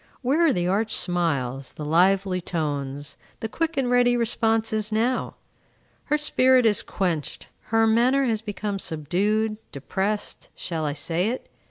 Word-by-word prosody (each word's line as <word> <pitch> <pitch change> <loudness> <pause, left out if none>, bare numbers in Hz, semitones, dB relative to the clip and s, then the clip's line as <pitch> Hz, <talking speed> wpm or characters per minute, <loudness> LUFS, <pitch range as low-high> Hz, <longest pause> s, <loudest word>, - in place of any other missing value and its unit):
Where 285 +7 +2
are - - +4
the 175 -5 0
arch 210 +4 0
smiles, 140 -7 -1
the 150 - -7
lively 185 +3 +2
tones, 145 -4 -4 0.2
the 225 - -3
quick 325 +7 -2
and 265 -2 +1
ready 245 0 +3
responses 225 -2 0
now? 235 +4 0 0.7
Her 300 - +1
spirit 260 -4 +3
is 215 -2 +4
quenched. 170 -6 -3 0.2
Her 225 0 +2
manner 245 +5 +3
has 225 -4 0
become 205 -2 -4
subdued, 205 +8 -1
depressed, 195 +9 -3
shall 160 -3 -3
I 145 - -1
say 165 +5 0
it? 255 - -6
210 Hz, 145 wpm, -24 LUFS, 170-235 Hz, 0.7 s, are